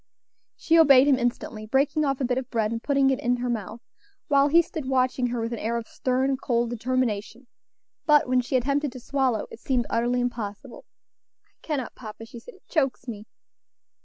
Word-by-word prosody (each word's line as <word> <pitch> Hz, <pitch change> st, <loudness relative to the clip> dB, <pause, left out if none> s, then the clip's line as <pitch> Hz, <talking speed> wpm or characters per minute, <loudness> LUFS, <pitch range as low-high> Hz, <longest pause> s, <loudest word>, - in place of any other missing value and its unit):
She 330 Hz, 0 st, +3 dB
obeyed 275 Hz, -4 st, +7 dB
him 270 Hz, -2 st, +4 dB
instantly, 240 Hz, -2 st, -3 dB
breaking 280 Hz, +5 st, +1 dB
off 275 Hz, -2 st, -1 dB
a 265 Hz, -, 0 dB
bit 250 Hz, +1 st, 0 dB
of 260 Hz, -1 st, -8 dB
bread 220 Hz, -2 st, 0 dB
and 230 Hz, 0 st, -3 dB
putting 275 Hz, -1 st, +2 dB
it 265 Hz, -, -1 dB
in 245 Hz, +1 st, +1 dB
her 245 Hz, 0 st, -2 dB
mouth, 220 Hz, 0 st, -5 dB, 0.5 s
while 280 Hz, -1 st, +4 dB
he 335 Hz, +4 st, +5 dB
stood 300 Hz, -5 st, -6 dB
watching 255 Hz, -1 st, +1 dB
her 240 Hz, 0 st, -3 dB
with 230 Hz, +1 st, -3 dB
an 230 Hz, -, -4 dB
air 230 Hz, +2 st, -1 dB
of 230 Hz, -1 st, -6 dB
stern, 260 Hz, +1 st, 0 dB
cold 240 Hz, -2 st, -1 dB
determination; 240 Hz, -1 st, -2 dB, 0.6 s
but 295 Hz, -3 st, +5 dB
when 255 Hz, 0 st, +2 dB
she 250 Hz, +2 st, -3 dB
attempted 280 Hz, +2 st, +1 dB
to 255 Hz, -, -8 dB
swallow, 260 Hz, -3 st, 0 dB
it -, -, -10 dB
seemed 245 Hz, -1 st, 0 dB
utterly 240 Hz, +2 st, +1 dB
impossible. 240 Hz, 0 st, -5 dB, 0.7 s
"I -, -, -44 dB
cannot, 285 Hz, -6 st, -3 dB
papa," 225 Hz, -1 st, -10 dB
she 235 Hz, +1 st, -11 dB
said, -, -, -14 dB
"it -, -, -25 dB
chokes 270 Hz, -5 st, -1 dB
me." 215 Hz, -2 st, -7 dB
250 Hz, 195 wpm, -25 LUFS, 235-275 Hz, 0.7 s, obeyed